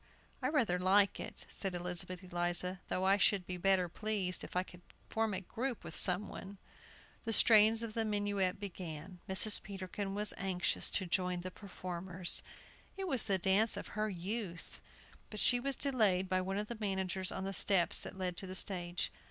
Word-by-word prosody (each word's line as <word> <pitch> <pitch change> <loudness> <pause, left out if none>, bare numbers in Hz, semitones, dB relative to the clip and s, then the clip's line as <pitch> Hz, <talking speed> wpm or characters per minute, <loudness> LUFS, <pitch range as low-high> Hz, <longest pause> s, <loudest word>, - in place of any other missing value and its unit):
"I - - +1
rather 230 - +1
like 195 +2 +4
it," - - -7
said 195 -3 -4
Elizabeth 180 +1 -3
Eliza, 175 +1 0
"though 185 - -1
I 195 +1 +5
should 200 -2 +3
be 180 - -4
better 185 0 +3
pleased 195 -1 -1
if - - -9
I 180 - +2
could 180 -1 -14 0.3
form 220 -1 +1
a 185 - -2
group 240 +6 -4
with - - -6
some 185 +2 +3
one." 195 +1 -8 0.7
The 225 - -2
strains 220 0 +6
of 225 -2 -5
the 225 - 0
minuet 205 -3 0
began. 180 -3 -7
Mrs. 205 +3 +5
Peterkin 195 0 -5
was 210 +1 +1
anxious 185 -2 0
to 190 - +1
join 180 0 0
the 185 +1 -6
performers. 180 -2 -4 0.6
It 385 -1 -3
was 265 -8 +4
the 195 - +2
dance 195 +5 +2
of - - -6
her 215 0 -1
youth. 185 -1 -5 0.5
But 215 - -7
she 245 +3 +4
was 275 +2 0
delayed 215 -10 +2
by 185 0 +1
one 190 +1 -2
of 210 +1 -2
the 235 - -6
managers 190 -2 -1
on 190 - -4
the 195 0 -3
steps 190 -2 +3
that 190 - -7
led 180 -2 -2
to 190 - -3
the 185 - -5
stage. 175 -2 -1
190 Hz, 185 wpm, -34 LUFS, 180-210 Hz, 0.7 s, strains